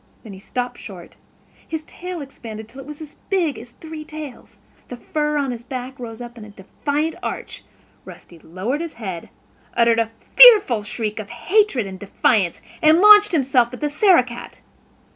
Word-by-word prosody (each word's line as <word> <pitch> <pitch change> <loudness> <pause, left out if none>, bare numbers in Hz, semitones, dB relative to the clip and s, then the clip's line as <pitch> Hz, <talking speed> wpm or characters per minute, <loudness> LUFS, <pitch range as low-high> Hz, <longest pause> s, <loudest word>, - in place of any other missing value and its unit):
Then 215 -4 -10
he 190 - -11
stopped 245 +4 -5
short; 185 -5 -11 0.5
his 320 -1 -5
tail 360 +2 -8
expanded 225 -5 -9
until 260 +5 -12
it 270 - -13
was 300 +1 -9
as 300 -2 -11
big 350 -7 0
as 235 +2 -12
three 315 -1 -9
tails. 305 -3 -10 0.3
The 245 - -8
fur 300 +4 -2
on 275 -3 -1
his 240 -1 -7
back 255 +1 -7
rose 230 -1 -8
up 240 0 -11
in - - -10
a 210 - -11
defiant 285 +10 -3
arch; - - -6 0.4
Rusty 170 - -14
lowered 190 - -4
his 335 -2 -6
head, 190 -7 -7 0.5
uttered 230 -1 +3
a 225 -1 0 0.3
fearful 425 - +8
shriek 210 +1 -4
of 210 - -7
hatred 270 - +1
and 190 -1 -8
defiance, 200 -2 0 0.2
and 315 0 +6
launched 420 +2 +8
himself 260 -6 +2
at - - -12
the 295 -1 -2
Sarah 355 -2 +5
cat. 240 -1 -10
250 Hz, 180 wpm, -21 LUFS, 225-310 Hz, 0.5 s, fearful